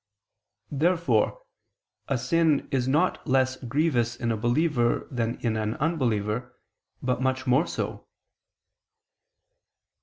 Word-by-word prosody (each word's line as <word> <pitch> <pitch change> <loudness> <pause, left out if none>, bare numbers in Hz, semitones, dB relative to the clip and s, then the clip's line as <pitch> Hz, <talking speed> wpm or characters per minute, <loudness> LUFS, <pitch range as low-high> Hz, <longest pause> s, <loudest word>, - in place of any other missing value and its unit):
Therefore 170 - +1 0.6
a 135 - 0
sin 155 +4 +2
is 130 -2 0
not 155 +7 +1
less 130 -1 +2
grievous 125 -2 +1
in 120 -1 -2
a - - +1
believer 120 +2 +1
than 120 -2 -1
in 115 -2 0
an 110 0 -1
unbeliever, 125 -6 -1 0.5
but 125 0 0
much 130 0 0
more 135 +6 +3
so. - - -4
130 Hz, 110 wpm, -26 LUFS, 120-150 Hz, 0.6 s, more